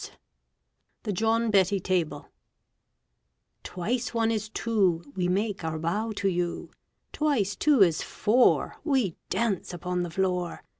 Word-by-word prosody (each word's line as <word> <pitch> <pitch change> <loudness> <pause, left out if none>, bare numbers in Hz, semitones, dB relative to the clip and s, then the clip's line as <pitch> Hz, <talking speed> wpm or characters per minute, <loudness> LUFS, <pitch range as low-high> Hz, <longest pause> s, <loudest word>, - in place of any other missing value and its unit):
] - - -50
THE 210 - -2
JOHN 225 +3 +1
BETTY 195 0 +3
TABLE 180 -3 -1 1.4
Twice 230 +6 -3
one 225 0 +2
is 215 -1 -2
two, 195 -8 +1
We 180 -1 0
make 200 +1 -1
our 160 -1 -2
bow 195 +8 -1
to 200 - -1
you. 175 -2 -2 0.4
Twice 245 -10 0
two 290 -8 +5
is 165 -3 +2
four, 245 +4 +2
We 260 - +1
dance 200 -6 -1
upon 180 +1 -2
the 175 - -3
floor. 180 0 -2
195 Hz, 135 wpm, -27 LUFS, 180-225 Hz, 1.4 s, two